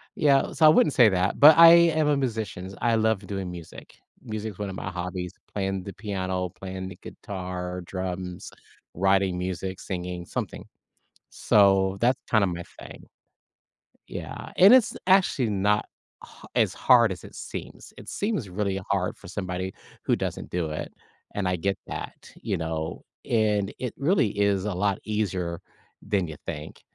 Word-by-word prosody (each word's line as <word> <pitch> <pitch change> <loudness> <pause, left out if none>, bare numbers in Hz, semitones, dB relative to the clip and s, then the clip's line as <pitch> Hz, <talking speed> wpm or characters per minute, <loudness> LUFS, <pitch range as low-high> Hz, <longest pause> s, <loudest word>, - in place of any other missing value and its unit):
yeah, 140 -2 +3
so 160 - +3
I - - +10
wouldn't 155 -1 +4
say 120 -4 +6
that, 95 0 0
but 150 +2 +9
I 165 0 +11 0.3
am 155 -1 +2
a 145 - +3
musicians, 105 -7 -3
I 115 -1 +2
love 110 -2 +1
doing 95 -1 -4
music. 85 -2 -11 0.3
Music 110 -2 -4
is 100 - -17
one 100 - -3
of 95 - -6
my 95 - -5
hobbies, 90 0 -5 0.2
playing 95 -2 -2
the 100 - -7
piano, 95 -3 -3
playing 95 +1 -7
the 95 - -11
guitar, 90 -2 -6
drums, 90 -1 -5 0.4
writing 95 0 +2
music, 95 +1 -4
singing, 90 -2 -5
something, - - -5 0.7
so 95 -2 +3
that's 125 +2 +3
kinda 110 -4 +4
my 85 -1 -4 0.2
thing. - - -11 1.0
Yeah, - - -7
and 195 +6 +8
it's 255 -4 +5
actually 185 - +3
not 105 +1 +1 0.4
h - - -14
as - - +2
hard 120 -4 +5
as 90 - -7
it - - -12
seems, - - -8
it - - -10
seems 200 - -2
really 95 +1 -2
hard - - 0
for - - -13
somebody 90 +1 -4 0.3
who - - +3
doesn't - - -4
do 85 -3 -2
it, 75 - -5 0.4
and 100 -2 -1
I 90 - +1
get 95 +3 -1
that, - - -8
you - - -2
know, 80 -1 -4 0.3
and 105 -3 +1
it 125 -3 -3
really 140 - +2
is 100 -1 +2
a 105 - -1
lot 100 +2 0
easier 95 -6 -2 0.4
than 95 -4 -1
you 80 - -7
think, 75 +1 -7
95 Hz, 165 wpm, -26 LUFS, 90-110 Hz, 1.0 s, I